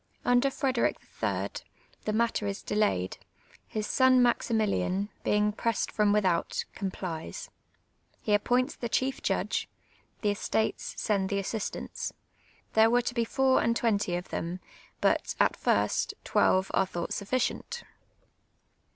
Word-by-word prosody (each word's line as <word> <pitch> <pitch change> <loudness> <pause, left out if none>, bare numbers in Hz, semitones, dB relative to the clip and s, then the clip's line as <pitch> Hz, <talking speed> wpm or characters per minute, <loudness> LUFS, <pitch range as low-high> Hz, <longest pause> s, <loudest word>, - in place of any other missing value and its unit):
I'nder 245 +2 +4
Frederic 265 -2 +1 0.3
III. - - 0 0.6
the 215 - 0
matter 225 -1 +1
is 200 0 -4
delayed; 205 - 0 0.5
his 215 -1 -3
son 260 +2 +5
Mnximili; 230 -3 +2
in, 195 +3 -1
being 210 0 +2
pressed 230 +2 -1
from 210 -1 +3
without, 190 -5 +1
complies. 190 - -5 0.7
He 210 - 0
ap 205 - +3
points 250 +1 +1
the 235 - -4
chief 265 +3 0
judge, - - -1 0.5
the 210 - +2
estates 220 +2 -1
send 195 -3 +1
the 200 - 0
a.ssistants, 200 +2 -3 0.6
'Tliere 220 0 +6
were 245 +1 +3
to 240 - -2
be 235 -1 +1
four 265 +2 +3
and 230 +1 +2
iwenty 205 -7 +1
of 180 - -7
them; 175 +2 -3 0.4
but, - - +2
at - - +4
first, - - +1
twelve 190 +1 +2
are 190 - +3
thought 175 -2 -3
sufficient. 255 - -2
215 Hz, 135 wpm, -29 LUFS, 200-245 Hz, 0.7 s, Tliere